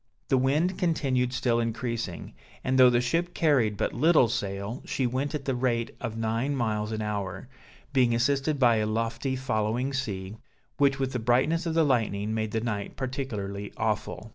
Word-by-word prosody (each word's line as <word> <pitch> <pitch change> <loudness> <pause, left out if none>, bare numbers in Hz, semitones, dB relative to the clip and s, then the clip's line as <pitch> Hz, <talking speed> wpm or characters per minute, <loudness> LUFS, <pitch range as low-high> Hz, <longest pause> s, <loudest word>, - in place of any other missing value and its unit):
The 135 - +4
wind 150 +8 +1
continued 135 -8 +1
still 120 -2 +1
increasing; 115 -5 -3 0.3
and 130 0 +1
though 125 -1 +9
the 120 -1 +3
ship 165 +8 -1
carried 125 -10 +2
but - - -1
little 155 -1 +4
sail, 100 0 -3
she 130 - -1
went 130 +5 -1
at 140 -2 -5
the 135 - 0
rate 120 -2 -1
of 115 -2 -4
nine 115 +5 -1
miles 110 -4 -1
an 110 -1 -2
hour, 100 -1 -4 0.5
being 125 -3 +3
assisted 140 +4 +1
by 120 -4 +4
a 105 0 0
lofty 115 +4 -1
following 125 +1 -1
sea, 105 -6 -4 0.4
which 140 -1 +3
with 135 -1 -1
the 125 - -2
brightness 130 +9 +2
of 160 - -1
the 165 -1 +4
lightning, 110 -5 0
made 110 -1 -1
the 110 +1 -1
night 105 -4 -4
particularly 110 -7 -4
awful. 110 0 -2
120 Hz, 175 wpm, -27 LUFS, 110-135 Hz, 0.5 s, though